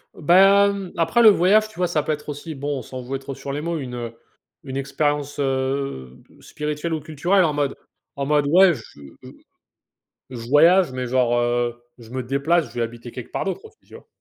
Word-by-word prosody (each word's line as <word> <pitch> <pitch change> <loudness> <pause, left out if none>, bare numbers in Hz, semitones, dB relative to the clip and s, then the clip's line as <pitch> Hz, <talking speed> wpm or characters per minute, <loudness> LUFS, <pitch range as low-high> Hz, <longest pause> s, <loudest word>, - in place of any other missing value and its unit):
Ben, 195 +3 +4
après 170 +8 +2
le 220 - +9
voyage, 205 +3 +4
tu - - -18
vois, 180 -1 +1
ça 155 -3 0
peut 155 - -3
être 150 0 -5
aussi, 145 +2 -6
bon, 140 0 -3
on - - -7
sans 130 +2 -8
jouer 135 +2 -4
trop 135 0 -8
sur 140 0 -7
les 145 - -3
mots, 170 0 -3
une, 130 -4 -6
heu, 115 -1 -6 0.5
une 135 0 -7
expérience, 145 +1 -2
heu, 135 - -2 0.2
spirituelle 150 +2 -4
ou 160 - -1
culturelle, 170 +6 +1
en 155 -3 +1
mode 145 -2 -1 0.4
en 140 0 -3
mode, 145 -1 +2
ouais, 180 +3 +6
je 120 - -8 0.4
je - - -10 1.0
je 120 -2 -8
voyage 170 +2 +5
mais 130 -1 -3
genre, 120 -1 +1
heu, 120 0 0 0.2
je 115 -2 -15
me 130 -1 -4
déplace, 140 +6 0
je - - -17
vais 120 - -2
habiter 120 +1 -6
quelque 125 - -9
part - - -1
d'autre 195 - -4
aussi, 435 -1 -16
tu - - -15
vois? - - -15
145 Hz, 210 wpm, -22 LUFS, 130-170 Hz, 1.0 s, le